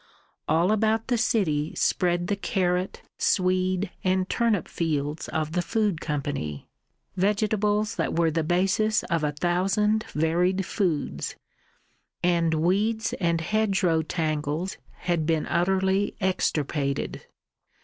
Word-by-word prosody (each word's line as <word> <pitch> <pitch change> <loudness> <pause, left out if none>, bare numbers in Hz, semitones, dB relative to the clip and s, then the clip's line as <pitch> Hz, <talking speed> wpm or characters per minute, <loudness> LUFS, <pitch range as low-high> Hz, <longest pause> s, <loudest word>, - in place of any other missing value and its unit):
All 170 +5 +3
about 220 +1 +1
the 245 - +2
city 160 - +1
spread 175 -1 +1
the 205 - 0
carrot, 185 -2 -1 0.2
swede, 185 0 +1
and 185 0 +1
turnip 230 -5 +1
fields 150 -2 -2
of 155 -1 -2
the 180 +2 0
Food 205 -3 0
Company, 140 - -3 0.5
vegetables 210 +2 +1
that - - -1
were 165 -1 +3
the 165 +1 0
basis 195 +6 +2
of 165 -2 -1
a 150 - +1
thousand 195 +7 +1
varied 175 +5 +1
foods, 170 -8 -2 0.9
and 170 -2 +2
weeds 210 +8 +1
and 170 -3 +1
hedgerow 190 -4 +1
tangles 155 +1 -2 0.2
had 170 -4 0
been 160 -2 +1
utterly 190 +3 +1
extirpated. 150 -7 -1
180 Hz, 115 wpm, -26 LUFS, 160-200 Hz, 0.9 s, All